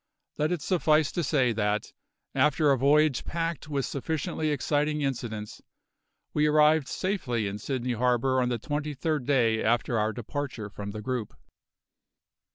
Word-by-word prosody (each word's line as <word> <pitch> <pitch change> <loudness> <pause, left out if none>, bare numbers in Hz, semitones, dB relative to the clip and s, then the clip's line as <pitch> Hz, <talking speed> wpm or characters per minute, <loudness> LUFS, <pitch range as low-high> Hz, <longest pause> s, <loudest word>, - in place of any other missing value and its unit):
Let 150 +2 +1
it 175 -5 -2
suffice 155 -5 +2
to 175 - -1
say 130 -5 +2
that, 105 -1 -1 0.4
after 150 0 +3
a - - +5
voyage 145 0 +3
packed 165 -2 -3
with 140 -3 -1
sufficiently 155 +2 -2
exciting 150 +1 0
incidents, 115 -6 -4 0.7
we 150 0 +3
arrived 150 -1 +4
safely 140 - -1
in 100 +1 -4
Sydney 125 +1 -2
harbour 125 +2 +2
on 125 - +1
the 120 - 0
twenty 145 +4 -3
third 150 -2 -1
day 115 -6 +2
after 115 0 +1
our 105 +1 +1
departure 120 -2 -5
from 100 0 -6
the 105 +1 -6
group. 125 -3 -3
135 Hz, 150 wpm, -27 LUFS, 120-150 Hz, 0.7 s, a